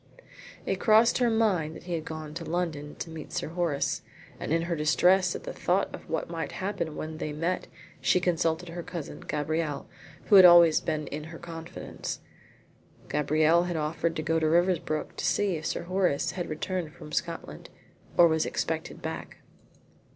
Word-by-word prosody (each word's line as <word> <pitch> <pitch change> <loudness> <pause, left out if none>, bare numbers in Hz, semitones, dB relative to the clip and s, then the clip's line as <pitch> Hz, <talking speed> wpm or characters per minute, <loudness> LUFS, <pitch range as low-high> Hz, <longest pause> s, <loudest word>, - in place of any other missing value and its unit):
It - - -1
crossed 225 +2 +5
her 245 -1 +3
mind 195 -9 +1
that - - -10
he 175 - -5
had 160 -2 -2
gone 155 -1 -6
up 150 - -11
to 170 - -6
London 160 -4 -3
to 165 - -6
meet 160 -2 -8
Sir - - -3
Horace, 170 -4 -1 0.4
and - - -4
in 165 +1 +2
her 170 0 -1
distress 180 +4 +3
at - - -6
the - - -5
thought 185 +3 0
of - - -10
what 160 - -1
might 165 -1 -4
happen 190 -5 -3
when 155 0 -5
they 150 - -3
met 165 +5 -2 0.3
she 180 - +3
consulted 170 -1 0
her 175 +1 -5
cousin 170 -3 -7
Gabrielle, 150 0 -2 0.4
who 205 - +7
had 190 - +10
always 170 -3 +8
been 155 -2 -2
in 150 +1 -5
her 165 +1 -9
confidence. 165 -1 -7 0.9
Gabrielle 155 +4 +3
had 175 -2 -2
offered 160 +2 -1
to 155 - -2
go 165 +1 +1
to 155 -1 +2
Riversbrook 170 -2 +1
to - - -4
see 200 -3 +1
if 155 - -4
Sir - - -2
Horace 180 -4 +1
had 175 -2 -4
returned 160 +1 -3
from 150 - -11
Scotland, 160 - -4 0.5
or 170 - +8
was 160 -1 +2
expected - - -3
back. - - -5
165 Hz, 180 wpm, -28 LUFS, 155-180 Hz, 0.9 s, had